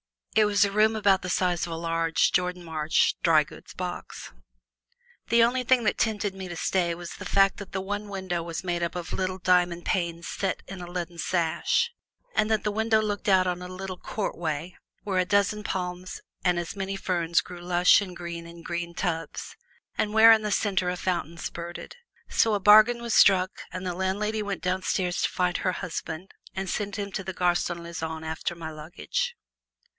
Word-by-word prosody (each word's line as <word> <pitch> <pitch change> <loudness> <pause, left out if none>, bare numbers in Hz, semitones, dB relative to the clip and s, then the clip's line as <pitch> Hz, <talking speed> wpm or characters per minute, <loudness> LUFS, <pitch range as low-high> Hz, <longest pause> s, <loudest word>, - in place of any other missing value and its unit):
It 215 - +6
was 205 0 +4
a 200 - -2
room 215 +2 +3
about 200 -3 +3
the 180 - -5
size 180 -1 +1
of 165 - -5
a - - -3
large 165 0 +1
Jordan 180 0 0
Marsh 160 -2 +1
drygoods 155 -3 +1
box. 180 -1 -6 1.0
The 235 0 +5
only 250 +2 +2
thing 250 0 +3
that 215 - +1
tempted 210 -2 0
me 190 -1 -7
to 175 - -6
stay 170 0 0
was 175 0 -8
the - - -8
fact 195 -1 +3
that 200 -2 -9
the 190 - -1
one 205 +2 -4
window 190 -3 -3
was 165 +2 -5
made 175 -1 -1
up 170 0 -2
of 175 -2 -5
little 185 0 -1
diamond 180 -2 +2
panes 170 -2 -1
set 195 -2 -2
in 190 -1 -7
a 175 - -7
leaden 175 -1 -5
sash, 175 - +1 0.4
and 215 -1 +2
that 220 -1 +1
this 210 - -1
window 220 +1 +2
looked 210 -1 -2
out 185 -1 +5
on 180 0 -2
a 180 - -6
little 185 0 -6
courtway 170 -4 -3 0.3
where 190 -3 0
a 185 - +2
dozen 200 +1 +1
palms 180 -1 -4 0.2
and 180 -1 +2
as 175 +3 -4
many 195 0 -3
ferns 170 -3 +1
grew 180 -1 -10
lush 175 +2 +5
and 185 -3 -6
green 170 -1 -6
in 170 0 -12
green 170 0 -4
tubs 165 -4 -3 0.4
and 210 - 0
where 220 +1 +9
in 220 -1 +6
the 210 - -2
center 195 -2 +1
a 180 - -1
fountain 170 -2 -2
spurted. 170 - -7 0.3
So 220 -2 +2
a - - 0
bargain 215 +4 +7
was 235 -2 -2
struck 185 -2 +6 0.2
and 185 +1 -5
the 180 - -1
landlady 205 +4 -1
went 200 -5 -4
downstairs 180 0 0
to - - +2
find 180 -1 0
her 185 - 0
husband 180 0 -5 0.2
to 190 0 -2
send 205 +2 -3
him 200 -1 -4
to 195 - -4
the 190 +1 -5
Gare 180 -1 +2
Saint 175 0 -2
Lazare 160 -1 -5
after 160 +2 -3
my 160 -1 -6
luggage. 155 - -3
180 Hz, 200 wpm, -27 LUFS, 170-200 Hz, 1.0 s, where